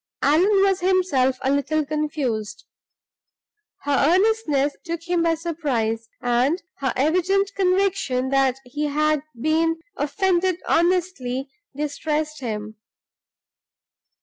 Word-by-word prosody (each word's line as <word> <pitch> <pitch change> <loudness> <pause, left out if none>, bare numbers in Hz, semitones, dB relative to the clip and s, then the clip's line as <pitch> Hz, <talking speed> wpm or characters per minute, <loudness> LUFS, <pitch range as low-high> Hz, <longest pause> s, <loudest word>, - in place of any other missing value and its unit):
Allan 385 +7 +4
was 390 -1 +2
himself 355 -9 +2
a 265 - +2
little 290 +2 0
confused. 290 -8 -3 1.2
Her 285 -1 +2
earnestness 365 -9 +1
took 335 -1 -5
him 350 -1 +1
by 330 0 +2
surprise, 260 -10 -2
and 250 +7 +2 0.2
her 265 -2 0
evident 365 +7 +1
conviction 370 -9 +1
that 270 -2 +2
he 295 +4 -3
had 305 0 +1 0.2
been 325 +4 +1 0.2
offended 365 +3 +1
honestly 325 -7 0 0.2
distressed 300 +1 -2
him. 215 -3 -5
305 Hz, 100 wpm, -23 LUFS, 270-360 Hz, 1.2 s, Allan